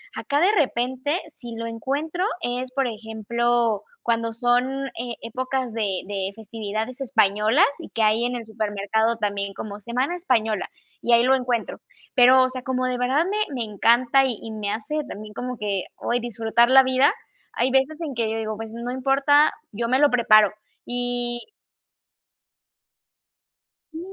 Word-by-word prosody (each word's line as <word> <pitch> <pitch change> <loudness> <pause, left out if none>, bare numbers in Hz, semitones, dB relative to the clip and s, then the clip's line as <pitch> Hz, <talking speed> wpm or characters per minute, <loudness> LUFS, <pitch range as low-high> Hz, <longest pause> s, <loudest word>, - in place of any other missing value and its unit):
acá 285 - -1
de 375 - +5
repente, 260 +1 0
si 240 -7 -10
lo 230 - -5
encuentro 285 - -2 0.2
es, 250 0 -3
por 270 -1 0
ejemplo, 225 0 -1 0.2
cuando 230 -1 0
son, 250 +3 +1
eh, 240 -1 -6
épocas 255 +1 -3
de 205 -5 -1
de 195 -1 -3
festividades 220 +3 -5
españolas, 220 - +3
y - - -9
que 225 - -1
hay 215 +2 +3
en 245 0 -1
el 235 - -5
supermercado 220 +1 -1
también 200 -2 -2
como 205 0 -7
semana 250 - -2
española, 225 - 0 0.3
y 240 - +2
ahí 235 0 +6
lo 265 +1 +4
encuentro. 245 -3 -2 0.4
Pero, 255 0 +7
o 255 - +1
sea, 255 -1 -7
como 255 -1 -1
de 250 -1 -1
verdad 260 +6 +1
me 405 +3 -2 0.2
me 240 - -1
encanta, 240 +6 +4
y 245 -5 -1
y 225 - -7
me 210 -2 -3
hace 225 +8 -4
también 210 -2 -9
como 250 +2 -5
que 200 -3 -2
hoy 240 - -1
disfrutar 235 0 +1
la 265 0 +8
vida. 260 +2 +3 0.4
Hay 245 +2 +1
veces 270 +4 +2
en 310 -4 -4
que 230 -3 -1
yo 225 - -2
digo: 215 -1 -3
"Pues, 225 0 -7
no 235 +1 -5
importa, 275 +3 +3 0.2
yo 230 +3 -3
me 260 +2 +2
lo 290 - +5
preparo". 215 -5 +5 0.3
Y 245 - -2 2.4
sí, 320 - -7
240 Hz, 165 wpm, -23 LUFS, 220-260 Hz, 2.4 s, la